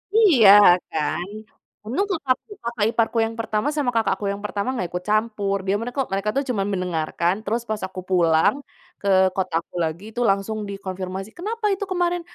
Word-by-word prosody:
Iya, 310 - +6 0.4
kan, 160 +3 -2 0.6
untung 335 - -1
kakakku 285 - -1
kakak 235 -3 -1
iparku 230 0 0
yang 225 0 -5
pertama, 215 +3 -1
sama 280 -5 0
kakak 225 -3 +2
aku 205 - -6
yang 200 +1 -6
pertama 205 +2 -3
nggak 185 -8 -2
ikut 180 0 -4
campur, 215 -2 0
dia 195 - +2
mereka 245 +4 -4
mereka 195 +2 -1
tuh 275 - +1
cuma 200 -5 0
mendengarkan, 175 0 -1
terus 230 +3 -1
pas 215 -2 -2
aku 185 0 -8
pulang 165 +3 +3 0.5
ke 200 - -4 0.3
kotaku 180 -3 -2
lagi, 160 +4 -3
itu 245 - -4
langsung 195 +3 0
dikonfirmasi, 190 0 -5
"Kenapa 430 +4 -4
itu 395 +1 -3
kemarin? 350 -1 0
210 Hz, 170 wpm, -23 LUFS, 185-245 Hz, 0.6 s, Iya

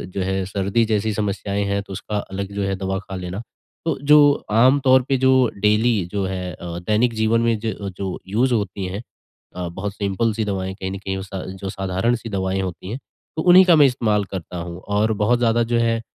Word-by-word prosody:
जो 100 - -1
है, 95 +1 -1
सर्दी 100 +3 0
जैसी 110 0 0
समस्याएँ 100 0 -2
हैं, 100 0 -1
तो 100 - -9
उसका 105 +2 -4
अलग 100 0 -5
जो 100 0 -2
है 95 0 -1
दवा 95 0 -2
खा 95 -1 -8
लेना। 90 +2 -5 0.4
तो 165 - 0
जो 150 +1 +7 0.3
आम 125 +6 +5
तौर 130 0 +6
पे 135 - +3
जो 130 +1 +3 0.3
डेली 105 -1 +2
जो 100 -1 -1
है 90 -1 -4
अ, 85 +1 -7
दैनिक 110 +6 +1
जीवन 110 +1 +2
में 115 -1 +2
ज 110 -2 -1 0.2
जो 95 -2 -4
यूज़ 120 +6 +1
होती 100 -3 -2
हैं 95 +3 -4 0.5
अ, 90 -1 -4
बहुत 95 +4 -5
सिंपल 100 +3 0
सी 110 +1 -1
दवाएँ 95 -2 -3
कहीं 95 -1 -5
न 95 - -4
कहीं 95 0 -4
वो 95 - -5
सा 95 -1 -6 0.2
जो 95 - -3
साधारण 95 +5 0
सी 115 -1 -7
दवाएँ 95 -1 -1
होती 90 0 -6
हैं, 115 - -3 0.4
तो - - +1
उन्हीं 180 +2 +8
का 175 -2 +6
मैं 150 -2 +7
इस्तेमाल 110 -5 +1
करता 90 -2 -6
हूँ। 85 +1 -6
और 105 +2 +1
बहुत 120 +3 +3
ज़्यादा 120 -1 +2
जो 120 - +3
है, 115 -1 +1
100 Hz, 225 wpm, -21 LUFS, 95-115 Hz, 0.5 s, उन्हीं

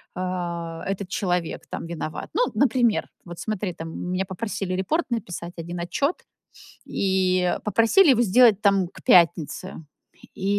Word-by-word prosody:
э, 170 -2 -4
этот 195 -1 -3
человек 180 -4 -2
там - - -5
виноват. 155 -2 -5
Ну, 485 - +2
например, 240 -4 +2 0.2
вот 175 -1 -9
смотри, 210 -4 -3
там 165 0 -7
меня 185 +1 -1
попросили 190 -1 -4
репорт 300 - 0
написать 175 -6 -4
1 170 +1 -6
отчёт 280 - -1 0.7
и 185 -2 +1
попросили 230 - +5
его 240 -1 +3
сделать 220 -1 +5
там 195 -3 +3
к - - -15
пятнице. 170 -4 +3 0.6
И 190 - -7
185 Hz, 135 wpm, -24 LUFS, 175-215 Hz, 0.7 s, попросили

